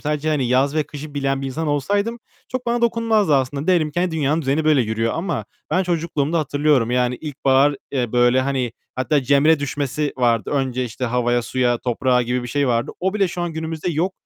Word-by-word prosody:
sadece, 150 Hz, +1 st, -2 dB
hani, 140 Hz, -5 st, +1 dB
yaz 135 Hz, +3 st, +2 dB
ve 155 Hz, -, +2 dB
kışı 150 Hz, 0 st, -9 dB
bilen 135 Hz, -1 st, -1 dB
bir -, -, -2 dB
insan 155 Hz, +4 st, -3 dB
olsaydım 200 Hz, -, 0 dB, 0.3 s
çok 255 Hz, -1 st, -4 dB
bana 235 Hz, 0 st, 0 dB
dokunmazdı 225 Hz, -7 st, +2 dB
aslında. 140 Hz, +3 st, -1 dB
Diyelim 170 Hz, -5 st, +2 dB
ki, 175 Hz, -, -2 dB
hani, 180 Hz, -1 st, +1 dB
dünyanın 155 Hz, 0 st, 0 dB
düzeni 140 Hz, +4 st, 0 dB
böyle 155 Hz, -3 st, +4 dB
yürüyor 115 Hz, +1 st, -1 dB
ama 165 Hz, -, -2 dB, 0.3 s
ben 185 Hz, -, +2 dB
çocukluğumda 165 Hz, -2 st, -1 dB
hatırlıyorum. 145 Hz, -5 st, +1 dB
Yani, 125 Hz, 0 st, +1 dB
ilkbahar, 140 Hz, -1 st, +2 dB
eee, 125 Hz, -4 st, -2 dB
böyle, 120 Hz, +1 st, +4 dB
hani, 130 Hz, -3 st, -1 dB, 0.2 s
hatta 135 Hz, +3 st, +1 dB
cemre 140 Hz, +4 st, +4 dB
düşmesi 145 Hz, +1 st, -2 dB
vardı. 120 Hz, -3 st, +1 dB
Önce, 130 Hz, -3 st, -1 dB
işte, 125 Hz, +2 st, -5 dB
havaya, 120 Hz, 0 st, +1 dB
suya, 120 Hz, -1 st, 0 dB
toprağa 125 Hz, +1 st, +1 dB
gibi 125 Hz, +1 st, -1 dB
bir 120 Hz, -, -6 dB
şey 140 Hz, 0 st, 0 dB
vardı. 115 Hz, 0 st, 0 dB
O 190 Hz, +2 st, 0 dB
bile 200 Hz, -3 st, +2 dB
şu 175 Hz, +1 st, -5 dB
an 170 Hz, -1 st, -3 dB
günümüzde 160 Hz, +1 st, -3 dB
yok. 170 Hz, +4 st, 0 dB
145 Hz, 200 wpm, -21 LUFS, 125-160 Hz, 0.3 s, böyle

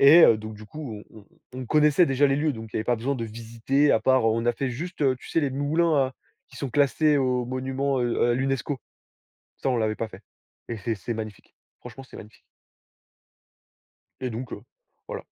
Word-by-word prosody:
Et 145 Hz, +5 st, +9 dB
heu, 115 Hz, -, +6 dB
donc 110 Hz, 0 st, -7 dB
du 105 Hz, +1 st, -11 dB
coup, 115 Hz, -4 st, -7 dB
on 110 Hz, -, -13 dB, 0.4 s
on 130 Hz, -, -5 dB
on 125 Hz, -, -6 dB
connaissait 150 Hz, +5 st, +4 dB
déjà 135 Hz, +2 st, +3 dB
les 135 Hz, -, +1 dB
lieux, 150 Hz, +1 st, +1 dB
donc 110 Hz, -3 st, -8 dB
il -, -, -3 dB
y -, -, +1 dB
avait 110 Hz, -, -2 dB
pas 120 Hz, -, +1 dB
besoin 135 Hz, +5 st, -1 dB
de 115 Hz, -3 st, -3 dB
visiter 115 Hz, +6 st, 0 dB
à 110 Hz, -, +4 dB
part, 130 Hz, +3 st, +4 dB
heu, -, -, +4 dB
on 115 Hz, +1 st, -1 dB
a 120 Hz, -, +4 dB
fait 130 Hz, +2 st, -2 dB
juste, 170 Hz, +7 st, -5 dB
heu, 130 Hz, -2 st, +3 dB
tu -, -, -13 dB
sais 165 Hz, -, +1 dB
les 145 Hz, -, 0 dB
moulins 155 Hz, +5 st, +1 dB
à 130 Hz, -1 st, +2 dB, 0.4 s
qui -, -, -15 dB
sont 135 Hz, -3 st, -4 dB
classés 145 Hz, +3 st, +3 dB
au 125 Hz, -2 st, +1 dB
monument, 130 Hz, +2 st, -1 dB
heu, 120 Hz, 0 st, +1 dB
à -, -, +4 dB
l'UNESCO. 135 Hz, +1 st, -1 dB, 0.8 s
Ça, -, -, -2 dB
on 125 Hz, -, +1 dB
l'avait 110 Hz, -1 st, 0 dB
pas 115 Hz, -, -3 dB
fait, -, -, -13 dB, 0.5 s
et 115 Hz, -, -3 dB
c'est 110 Hz, +3 st, -2 dB
c'est 110 Hz, +4 st, -5 dB
magnifique. 110 Hz, -2 st, -8 dB, 0.3 s
Franchement, 125 Hz, +2 st, -10 dB
c'est -, -, -13 dB
magnifique. 105 Hz, +1 st, -13 dB, 1.8 s
Et 130 Hz, -, -2 dB
donc 120 Hz, +3 st, -6 dB
heu, -, -, -7 dB, 0.5 s
voilà. -, -, -6 dB
130 Hz, 220 wpm, -25 LUFS, 115-140 Hz, 1.8 s, Et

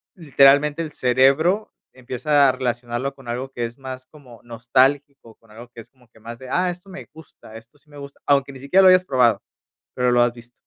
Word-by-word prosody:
literalmente 145 Hz, -1 st, +3 dB
el 160 Hz, -2 st, -6 dB
cerebro 135 Hz, -, +1 dB, 0.2 s
empieza 135 Hz, +3 st, +1 dB
a -, -, +3 dB
relacionarlo 120 Hz, +1 st, -4 dB
con 135 Hz, -2 st, -18 dB
algo 125 Hz, +3 st, -5 dB
que 120 Hz, -2 st, -4 dB
es 115 Hz, +1 st, -10 dB
más 130 Hz, -1 st, -9 dB
como 130 Hz, -7 st, -17 dB
nostálgico, 125 Hz, +2 st, -1 dB
con 115 Hz, -2 st, -26 dB
algo 120 Hz, +3 st, -13 dB
que 120 Hz, -, -15 dB
es -, -, -20 dB
como 125 Hz, -2 st, -28 dB
que 110 Hz, -, -23 dB
más 115 Hz, +1 st, -10 dB
de: 130 Hz, -, -11 dB
"Ah, 180 Hz, +6 st, 0 dB
esto 180 Hz, +2 st, -13 dB
me 190 Hz, 0 st, -11 dB
gusta, 155 Hz, -8 st, -16 dB
esto 115 Hz, +6 st, -15 dB
sí 150 Hz, +1 st, -28 dB
me 145 Hz, -, -14 dB
gusta", 140 Hz, 0 st, -12 dB
aunque 140 Hz, -1 st, +1 dB
ni 135 Hz, -, -13 dB
siquiera 140 Hz, +9 st, +2 dB
lo 190 Hz, -, +6 dB
hayas 185 Hz, 0 st, +4 dB
probado, 125 Hz, -, +1 dB, 0.6 s
pero, 125 Hz, 0 st, +1 dB
lo 120 Hz, -, +3 dB
has 120 Hz, 0 st, +1 dB
visto. 120 Hz, 0 st, -16 dB
130 Hz, 220 wpm, -21 LUFS, 120-145 Hz, 0.6 s, lo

